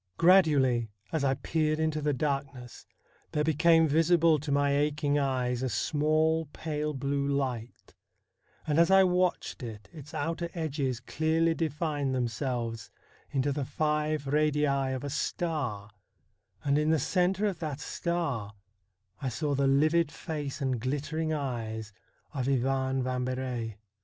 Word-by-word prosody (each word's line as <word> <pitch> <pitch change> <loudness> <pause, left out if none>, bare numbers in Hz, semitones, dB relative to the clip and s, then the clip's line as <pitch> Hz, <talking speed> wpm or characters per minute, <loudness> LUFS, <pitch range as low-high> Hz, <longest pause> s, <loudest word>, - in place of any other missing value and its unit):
Gradually 145 - +4 0.2
as 160 -3 -1
I 135 -1 +2
peered 155 +2 0
into 155 -1 0
the 150 0 +1
darkness 135 -3 -3 0.5
there 150 - +1
became 160 +1 +4
visible 165 +1 +4
to 145 +1 -4
my 140 0 +2
aching 145 0 +1
eyes 125 -3 0
a 130 - -1
small, 155 +3 +1
pale 150 -1 -3
blue 140 +1 -1
light; 130 -4 -3 0.7
and 150 +1 +1
as 170 - +5
I 190 0 +7
watched 180 -3 0
it 105 -4 -8
its 145 -2 -10
outer 165 +3 -2
edges 140 -6 -2
clearly 160 +5 +1
defined 150 -4 -1
themselves 120 -1 -2 0.4
into 140 0 0
the 140 0 -2
five 150 +1 -1
radii 150 +1 +2 0.3
of 130 - -5
a 145 - -3
star, 135 -11 -2 0.7
and 140 +1 +2
in 150 +1 +1
the 160 - +4
centre 185 +7 +1
of 195 -5 -1
that 150 -4 -4
star 150 - -2 0.7
I 135 - -1
saw 145 +4 -2
the 140 0 +2
livid 155 +3 +3
face 150 -4 -5
and 130 -3 0
glittering 150 +5 -2
eyes 115 -7 -3 0.4
of 130 -3 -2
Ivan 135 0 +1
Vambery. 125 -3 -3
145 Hz, 135 wpm, -29 LUFS, 130-160 Hz, 0.7 s, I